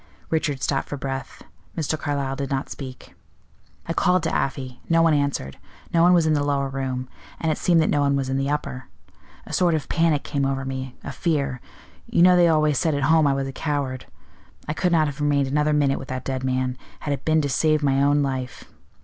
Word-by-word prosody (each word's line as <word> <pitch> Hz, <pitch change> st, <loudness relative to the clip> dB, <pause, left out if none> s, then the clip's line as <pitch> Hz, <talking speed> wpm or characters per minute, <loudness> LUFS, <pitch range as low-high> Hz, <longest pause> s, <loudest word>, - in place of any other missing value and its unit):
Richard 150 Hz, -4 st, -1 dB
stopped 135 Hz, -1 st, -1 dB
for 145 Hz, -, -4 dB
breath. 135 Hz, -1 st, -5 dB, 0.3 s
Mr. 155 Hz, -1 st, 0 dB
Carlyle 140 Hz, -3 st, -2 dB
did 140 Hz, -1 st, -4 dB
not 135 Hz, -1 st, -2 dB
speak. 130 Hz, -2 st, -9 dB, 0.7 s
"I 165 Hz, -, -1 dB
called 180 Hz, 0 st, +2 dB
to 160 Hz, -, -1 dB
Afy. 130 Hz, -2 st, -3 dB
No 165 Hz, 0 st, +4 dB
one 165 Hz, -1 st, +4 dB
answered. 140 Hz, -, -1 dB, 0.3 s
No 165 Hz, -, +4 dB
one 175 Hz, +1 st, +6 dB
was 175 Hz, -3 st, +4 dB
in 155 Hz, -, +3 dB
the 145 Hz, -1 st, +1 dB
lower 140 Hz, -1 st, 0 dB
room; 130 Hz, -1 st, -3 dB, 0.3 s
and 160 Hz, -, 0 dB
it -, -, -1 dB
seemed 170 Hz, -2 st, +3 dB
that -, -, 0 dB
no 145 Hz, -, +2 dB
one 140 Hz, 0 st, +2 dB
was 135 Hz, -1 st, -1 dB
in 130 Hz, -, -1 dB
the 135 Hz, +1 st, -1 dB
upper. 140 Hz, -4 st, -3 dB, 0.6 s
A -, -, -9 dB
sort 175 Hz, -3 st, +3 dB
of 155 Hz, -, -3 dB
panic 165 Hz, -3 st, +2 dB
came 140 Hz, -1 st, -2 dB
over 135 Hz, 0 st, -1 dB
me, 130 Hz, -1 st, -5 dB
a -, -, -5 dB
fear. 140 Hz, -3 st, -1 dB, 0.5 s
You 170 Hz, -, +3 dB
know 180 Hz, 0 st, +7 dB
they 175 Hz, -1 st, +5 dB
always 155 Hz, -3 st, +3 dB
said 160 Hz, -3 st, +1 dB
at 140 Hz, -, -1 dB
home 160 Hz, -2 st, +5 dB
I 140 Hz, -, +3 dB
was 135 Hz, 0 st, -2 dB
a -, -, -4 dB
coward: 140 Hz, -3 st, -3 dB, 0.6 s
I 150 Hz, -, -1 dB
could 180 Hz, +3 st, 0 dB
not 160 Hz, -2 st, +4 dB
have 145 Hz, 0 st, -5 dB
remained 145 Hz, -1 st, +2 dB
another 150 Hz, +2 st, +1 dB
minute 145 Hz, -2 st, +2 dB
with -, -, -8 dB
that 130 Hz, 0 st, -5 dB
dead 130 Hz, -1 st, -3 dB
man, 130 Hz, 0 st, -1 dB, 0.2 s
had 145 Hz, -, -1 dB
it 140 Hz, -, -5 dB
been 155 Hz, 0 st, +3 dB
to 145 Hz, -, -1 dB
save 155 Hz, +3 st, +2 dB
my 135 Hz, -1 st, +2 dB
own 145 Hz, +1 st, +3 dB
life. 130 Hz, -2 st, -4 dB
140 Hz, 225 wpm, -23 LUFS, 135-155 Hz, 0.7 s, know